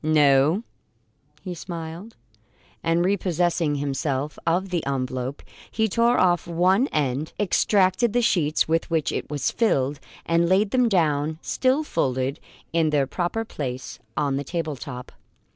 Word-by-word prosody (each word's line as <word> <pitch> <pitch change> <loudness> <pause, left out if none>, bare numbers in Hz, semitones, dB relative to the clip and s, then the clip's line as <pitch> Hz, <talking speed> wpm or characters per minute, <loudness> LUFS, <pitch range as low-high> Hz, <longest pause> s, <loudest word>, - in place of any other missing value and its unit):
"No?" 150 +4 +4 0.8
he 185 -2 -4
smiled; 170 +5 -7 0.7
and, 165 +1 +1
repossessing 175 -5 +1
himself 140 0 -2
of 180 +4 +1
the 175 -3 -1
envelope, 130 0 -3 0.3
he 220 0 +1
tore 235 +3 +2
off 175 -2 +2
one 185 +8 +3
end, 145 - -1
extracted 205 +2 +2
the 245 +2 +1
sheets 155 -8 +2
with 165 +1 0
which 160 -3 0
it - - -4
was 145 -3 -1
filled, 145 - +1 0.3
and 170 0 +2
laid 195 +2 +3
them 250 -2 +3
down 155 -5 +1
still 260 +1 +1
unfolded, 130 - -1 0.3
in 165 -2 +3
their 145 -2 +2
former 175 +10 -2
place 130 - -6 0.2
on 140 -2 +1
the 140 - -2
table 160 0 -3
top. 125 -2 -8
165 Hz, 140 wpm, -24 LUFS, 140-185 Hz, 0.8 s, No